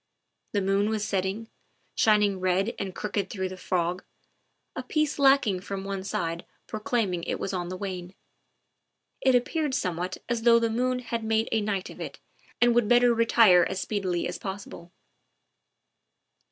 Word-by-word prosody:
The 200 -2 +1
moon 195 +2 +2
was 215 -1 -1
setting, 195 +2 -2 0.5
shining 210 -3 +3
red 185 +4 +1
and 190 -2 -4
crooked 200 -2 -2
through 190 -2 -3
the 185 - -7
fog, 180 0 -1 0.7
a - - -3
piece 305 -2 -1
lacking 270 -9 +4
from 195 +1 -5
one 195 -1 -4
side 170 -4 -3 0.2
proclaiming 215 -6 -1
it - - -2
was 195 - -3
on 175 -1 -3
the 185 - -5
wane; 185 -2 -6 1.1
it 260 -1 +4
ap 245 0 +3
peared 305 -5 -1
somewhat 180 -1 -2
as 235 -1 -1
though 230 0 +6
the 230 -1 +1
moon 250 +2 0
had 235 -2 -4
made 220 0 +1
a 225 - +2
night 200 -3 -2
of - - -11
it - - -6 0.4
and 240 0 +5
would 235 -2 +3
better 245 +1 +5
retire 225 -5 +5
as 190 - -3
speedily 190 -5 -1
as - - -5
possible. 190 -3 -7
205 Hz, 165 wpm, -27 LUFS, 185-230 Hz, 1.1 s, though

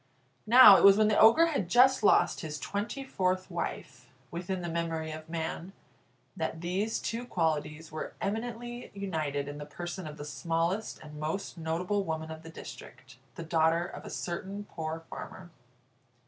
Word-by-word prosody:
Now 230 -4 +10
it - - +2
was 200 0 +8
when 215 0 +4
the 210 - +2
Ogre 230 +10 +7
had 280 - -1
just 255 +5 +5
lost 210 - +4
his 155 -1 -5
twenty 205 - -4
fourth 185 -6 -1
wife 130 -7 -5 0.2
(within 180 +1 -4
the - - -3
memory 165 -1 -2
of 155 +1 -9
man) 165 +3 -4 0.6
that 160 - -3
these 190 +6 -1
two 230 +2 -3
qualities 160 -6 -2
were 155 - -5
eminently 240 +3 -4
united 155 -8 -2
in 145 +1 -7
the - - -5
person 175 +3 -6
of 150 0 -8
the 145 - -7
smallest 170 +6 -2
and 150 0 -10
most 160 +7 -3
notable 175 +5 -1
woman 160 -2 -4
of 160 0 -8
the 165 - -11
district, 130 -4 -11 0.2
the 170 - -6
daughter 165 +1 +2
of - - -9
a - - -8
certain 190 +4 -5
poor 160 -4 -5
farmer. 175 +2 -9
170 Hz, 165 wpm, -30 LUFS, 160-200 Hz, 0.6 s, Now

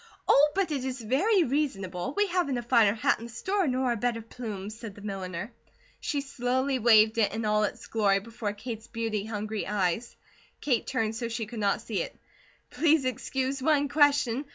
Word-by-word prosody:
"Oh, 295 +2 +6
but 390 -4 +1
it 275 -4 -1
is 260 -1 -3
very 340 - +3
reasonable! 255 - -2
We 415 - +4
haven't 350 -9 0
a 240 - -3
finer 230 -4 +4
hat 220 - +1
in 230 - -8
the 235 - -9
store, 380 - -1
nor 255 -1 +1
a - - +1
better 230 0 -1
plume," 215 -4 -6
said 220 -2 -9
the 205 - -12
milliner. 195 +1 -5 0.5
She 285 - -2
slowly 260 0 -1
waved 220 -1 +5
it 215 - +3
in 220 +1 -3
all 210 0 +3
its - - -6
glory 205 -3 +2
before 220 0 -5
Kate's 220 +1 -7
beauty 225 -3 -3
hungry 215 -1 -4
eyes. 205 +3 -1 0.4
Kate 250 -6 0
turned 225 -4 -1
so 235 +1 -3
she 225 -1 -3
could 230 +1 -7
not 205 +1 +1
see 220 -2 -2
it. - - -6 0.5
"Please 315 -4 +3
excuse 265 +2 -2
one 290 0 +2
question. 285 -3 +3
235 Hz, 190 wpm, -28 LUFS, 215-270 Hz, 0.5 s, Oh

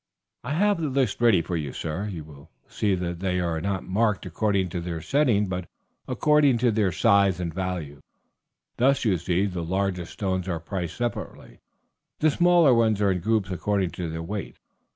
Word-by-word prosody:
"I 135 +5 -3
have 200 +1 +2
the 155 - -1
list 130 -5 0
ready 110 -8 +4
for 85 - -3
you, 75 -5 -3
sir; 85 +6 -4
you 90 -6 -6
will 75 +1 -15 0.2
see 100 -3 0
that 85 -1 -4
they 90 -1 -1
are 85 -2 -1
not 95 0 -2
marked 105 +2 0
according 95 +1 0
to 85 +1 -4
their 85 -1 -4
setting, 115 - +2
but 90 -2 -4 0.4
according 150 -4 +3
to 120 0 +2
their 105 -3 +1
size 100 -1 +3
and 85 -2 -3
value. 85 -6 -4 0.8
Thus, 130 +1 +2
you 100 -4 +3
see, 90 +3 0
the 90 -4 -3
largest 90 0 -2
stones 95 -2 -2
are 85 -3 -2
priced 85 0 -5
separately; 120 -1 -5 0.6
the 155 0 +3
smaller 175 -3 +5
ones 110 -3 +3
are 100 -2 +3
in 90 - -1
groups 105 +1 0
according 95 0 -1
to 85 0 -5
their 80 +1 -5
weight. 100 +3 -5
95 Hz, 185 wpm, -25 LUFS, 85-115 Hz, 0.8 s, smaller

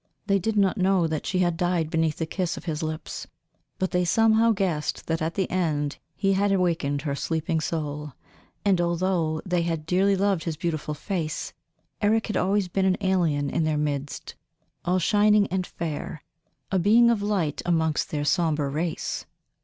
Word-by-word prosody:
They 200 -1 +2
did 215 +3 -1
not 200 +1 +2
know 185 -2 +3
that 155 -2 -2
she 185 - 0
had 175 -1 0
died 175 -2 0
beneath 160 -2 +1
the 165 - -1
kiss 180 +2 -2
of - - -9
his 160 -2 -2
lips, 155 0 -5 0.5
but 190 - -1
they 180 0 +2
somehow 225 +5 +4
guessed 185 -7 -1
that 165 0 -1
at 160 +1 -2
the 190 - 0
end 150 -6 -1 0.2
he 195 0 +1
had 200 +1 +2
awakened 165 -7 +1
her 145 -3 -1
sleeping 160 +2 -1
soul; 150 -3 -3 0.5
and 190 -3 +3
although 170 -2 0
they 180 -2 +1
had 165 -2 -2
dearly 190 +4 +3
loved 195 -3 +1
his 160 -3 -3
beautiful 155 -3 -2
face, 155 -1 -3 0.5
Eric 220 +2 +2
had 210 - -2
always 195 0 +1
been 190 +2 0
an 185 -1 +3
alien 160 -7 +1
in 165 - +1
their 155 -1 +1
midst, 145 -1 -3 0.5
all 180 +1 +2
shining 210 +2 +4
and 185 0 -1
fair, 160 -2 -5 0.5
a 190 - +2
being 230 +6 +5
of 220 -3 0
light 195 -8 0
amongst 160 -2 +1
their 150 -4 -2
sombre 150 -2 +1
race. 155 +3 -3
175 Hz, 175 wpm, -25 LUFS, 155-195 Hz, 0.5 s, being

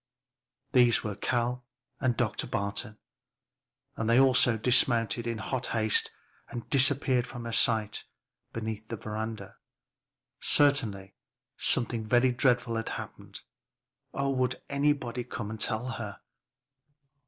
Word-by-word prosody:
These 120 -3 +4
were 105 - -3
Cal 120 +3 -1 0.4
and 130 -4 0
Dr. - - -1
Barton, 100 +1 -3 1.0
and 110 0 -2
they 120 +2 +5
also 125 -3 +4
dismounted 120 0 +2
in 115 -1 -2
hot 125 +3 -3
haste 110 -2 +2 0.4
and 120 -2 -7
disappeared 135 -2 +3
from 120 -2 -8
her 115 - -4
sight 110 -2 +2 0.5
beneath 110 -1 -5
the 115 - -4
veranda. 110 +2 -6 0.8
Certainly 110 -10 +2 0.4
something 115 -1 +1
very 120 +3 +3
dreadful 125 -2 +1
had 115 - -3
happened. - - -8 0.7
Oh 140 0 -1
would 130 -1 0
nobody 140 -4 0
come 110 -3 -6
to 110 - +2
tell 110 +3 -3
her! 110 -5 -6
120 Hz, 120 wpm, -29 LUFS, 110-125 Hz, 1.0 s, they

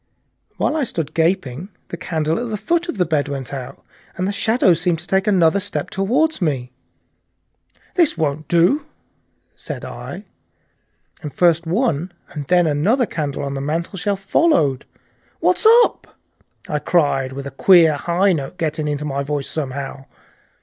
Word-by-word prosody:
While - - 0
I 310 - +1
stood 165 - -3
gaping 165 -1 0 0.2
the - - -5
candle 160 +1 -1
at 240 0 -4
the 215 - -2
foot 340 - -1
of 235 - -3
the 180 - +2
bed 155 -3 0
went 140 -2 -5
out, 135 0 -7 0.3
and 185 0 -1
the - - 0
shadows 200 -5 +2
seemed 175 -2 +1
to 170 - -7
take 190 +3 +1
another 185 -2 +4
step 200 +1 -3
toward 255 +10 +1
me. 130 -7 -1 1.2
"This 335 - +2
won't 155 -1 -2
do!" 185 - +2 0.7
said - - -7
I, - - -8 1.0
and 150 -4 -6
first 170 0 +2
one 175 - 0 0.2
and 145 -3 -7
then 175 -1 +4
another 190 - +2
candle 145 -7 -4
on 140 0 -3
the 135 - -4
mantelshelf 180 +7 -2
followed. 195 - +2 0.5
"What's - - +2 0.2
up?" - - -9 0.5
I 150 - -1
cried, 145 -5 +1
with 140 +1 -6
a 140 - -6
queer 165 +1 +5
high 175 +6 +1
note 150 +3 -4
getting 155 -1 -2
into 145 0 -2
my 140 -1 -2
voice 140 0 -3
somehow. 135 -2 -5
165 Hz, 155 wpm, -20 LUFS, 145-195 Hz, 1.2 s, queer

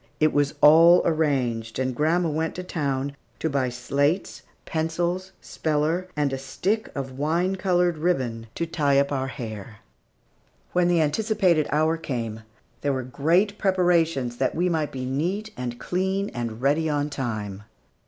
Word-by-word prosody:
It 155 0 +3
was 145 -1 +1
all 165 +4 +8
arranged, 130 -8 0
and 130 -1 -1
grandma 165 +5 +2
went 160 +1 -2
to 180 - -5
town 140 -5 -2 0.2
to 160 - -2
buy 135 -2 +1
slates, 140 +8 -1 0.2
pencils, 170 +4 -2
speller, 160 +4 -1
and 145 -2 0
a 135 - -2
stick 190 +11 -2
of 135 -1 -5
wine 170 +6 +1
colored 180 -3 +1
ribbon 125 -9 -1
to 170 - -1
tie 145 -4 +1
up 140 +1 +2
our 135 -1 -1
hair. 110 -5 -7 0.9
When 180 -1 +3
the 175 -2 +3
anticipated 175 -1 +2
hour 155 +2 +2
came, 115 -8 -4 0.4
there 145 -1 0
were 130 -1 -2
great 170 - +1
preparations 165 - +2
that 130 - 0
we 180 +3 +1
might 160 -3 -1
be 130 -1 -5
neat 180 +12 -2
and 120 -1 -5
clean 190 +2 -1
and 120 -1 -5
ready 155 +3 +2
on 145 0 -1
time. 110 -7 -4
150 Hz, 155 wpm, -25 LUFS, 130-175 Hz, 0.9 s, all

